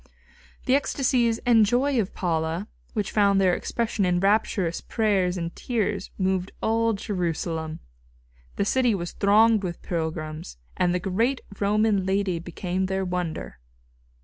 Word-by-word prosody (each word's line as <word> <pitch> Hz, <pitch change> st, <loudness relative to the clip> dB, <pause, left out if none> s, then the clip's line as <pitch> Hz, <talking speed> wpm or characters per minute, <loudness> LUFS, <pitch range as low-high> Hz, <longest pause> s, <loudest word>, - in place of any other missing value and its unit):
The 255 Hz, -, +2 dB
ecstasies 255 Hz, -4 st, +2 dB
and 230 Hz, -3 st, +6 dB
joy 245 Hz, +4 st, +2 dB
of 195 Hz, -, -6 dB
Paula, 165 Hz, +2 st, -1 dB, 0.3 s
which 210 Hz, -3 st, -2 dB
found 200 Hz, -2 st, +3 dB
their 185 Hz, -2 st, +4 dB
expression 225 Hz, +1 st, -1 dB
in 180 Hz, -1 st, +2 dB
rapturous 195 Hz, -3 st, +1 dB
prayers 195 Hz, -5 st, +1 dB
and 170 Hz, -1 st, -4 dB
tears, 210 Hz, -5 st, -2 dB
moved 190 Hz, -1 st, 0 dB
all 225 Hz, 0 st, +1 dB
Jerusalem. 165 Hz, -5 st, -3 dB, 0.7 s
The 200 Hz, -, 0 dB
city 245 Hz, 0 st, +2 dB
was 175 Hz, -2 st, -4 dB
thronged 215 Hz, +2 st, +4 dB
with 175 Hz, -3 st, -5 dB
pilgrims, 155 Hz, -, -4 dB, 0.2 s
and 180 Hz, -, +2 dB
the 180 Hz, -, 0 dB
great 225 Hz, +8 st, 0 dB, 0.2 s
Roman 210 Hz, 0 st, +2 dB
lady 190 Hz, -2 st, 0 dB
became 180 Hz, +2 st, -3 dB
their 190 Hz, 0 st, -1 dB
wonder. 170 Hz, -, -4 dB
195 Hz, 135 wpm, -25 LUFS, 175-220 Hz, 0.7 s, and